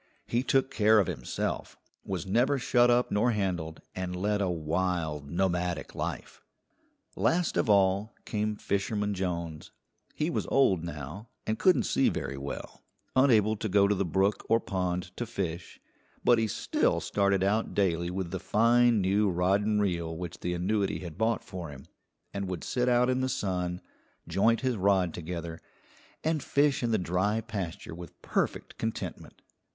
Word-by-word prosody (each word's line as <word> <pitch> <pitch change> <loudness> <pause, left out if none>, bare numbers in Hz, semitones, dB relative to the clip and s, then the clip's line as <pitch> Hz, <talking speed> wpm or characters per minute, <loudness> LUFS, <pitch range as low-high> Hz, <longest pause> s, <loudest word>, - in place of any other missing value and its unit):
He 120 - 0
took 135 0 +1
care 110 0 +4
of 100 - +4
himself, 85 -3 -4 0.3
was 95 -5 -4
never 125 +9 +2
shut 120 -1 +3
up 120 +1 +3
nor 115 +4 +2
handled, 90 -6 -2
and 90 -1 -4
led 105 +3 0
a 95 - +1
wild, 80 -3 -1
nomadic 90 -1 -1
life. - - -5 0.7
Last 175 0 +1
of - - +1
all 100 +1 +3
came 105 0 -1
Fisherman 105 +1 -1
Jones. 85 -4 -4 0.5
He 155 +3 0
was - - -2
old 95 -11 +3
now 85 - -7 0.2
and 110 - -1
couldn't 185 -2 +4
see - - +2
very 70 - -3
well, 70 +1 -7 0.3
unable 110 -5 +4
to 110 - -3
go 100 +1 +4
to 105 - +3
the 100 -1 0
brook 95 +4 +1
or 115 - +5
pond 90 -3 -3
to 120 - -3
fish, 85 -5 -4 0.4
but 120 -2 +5
he 110 - +1
still - - +1
started 100 -1 +1
out 105 +3 0
daily 85 -3 +1
with 90 -1 -3
the 95 - -3
fine 115 +4 +4
new 100 +2 +2
rod 90 +3 +2
and 105 0 +1
reel 85 -5 -1
which 90 -1 -6
the 90 0 -2
annuity 100 +3 0
had 85 -4 -7
bought 110 +4 0
for 90 -3 -7
him, 65 -2 -11 0.5
and 100 -1 -3
would 90 -3 -4
sit 125 0 0
out 125 0 +4
in 130 0 +1
the 130 - 0
sun, 90 -5 -2 0.5
joint 115 +4 +2
his 130 -3 0
rod 95 -3 +2
together, 85 -1 -6 0.6
and 160 -1 0
fish 145 +1 +2
in 120 - 0
the 110 - +2
dry 95 +4 0
pasture 100 -8 -5
with 85 0 -10
perfect - - -2
contentment. 115 0 -5
100 Hz, 165 wpm, -29 LUFS, 90-110 Hz, 0.7 s, or